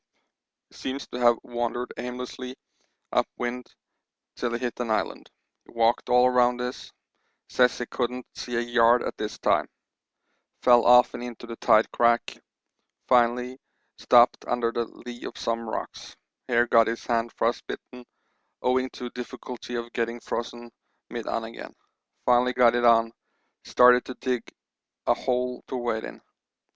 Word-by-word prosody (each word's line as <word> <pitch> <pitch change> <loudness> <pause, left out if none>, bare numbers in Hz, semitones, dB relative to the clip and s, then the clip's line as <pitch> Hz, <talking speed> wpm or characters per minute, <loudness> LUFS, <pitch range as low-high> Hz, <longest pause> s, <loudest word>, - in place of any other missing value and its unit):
He - - -17
seems 135 +1 -5
to 125 - -6
have 120 -1 +4
wandered 120 +1 -3
aimlessly 125 +1 -6 0.6
up - - +2
wind 125 0 -4 0.7
till 120 - -2
he - - 0
hit 120 0 -4
an 120 -2 -2
island; 110 - -2 0.3
he - - -19
walked 115 0 +1
all 125 +1 +5
round 125 0 +3
this; 125 0 -5 0.6
says 125 -1 +3
he 125 - -3
couldn't 125 +1 -3
see 120 - -6
a 115 - +1
yard 120 0 +3
at - - -4
this 105 0 -4
time; - - +1 1.0
fell 120 -1 +6
often 125 0 +5
into 120 -1 -8
the 115 -1 -7
tide 110 +1 +4
crack; 120 0 +2 0.7
finally 125 +1 +2 0.4
stopped 120 0 +5
under 120 -1 0
the 120 0 -1
lee 120 +1 -11
of - - -7
some 115 -1 -3
rocks; - - -7 0.3
here 120 0 +3
got 115 -2 +4
his 115 +1 -4
hand 115 -1 0
frostbitten 125 +1 -3 0.6
owing 130 +1 +1
to 125 -1 -7
difficulty 125 0 -7
of 120 0 -5
getting 115 0 -2
frozen 120 0 -5 0.4
mit - - -5
on 115 - -2
again, 115 +1 -9 0.5
finally 125 +1 +3
got 120 -2 +5
it 120 0 +1
on; 115 -1 +5 0.5
started 125 0 +6
to 130 - -7
dig 125 -3 -2 0.6
a - - +4
hole 125 -1 -2
to 130 - -4
wait 120 -2 -2
in. - - -8
120 Hz, 150 wpm, -26 LUFS, 115-125 Hz, 1.0 s, fell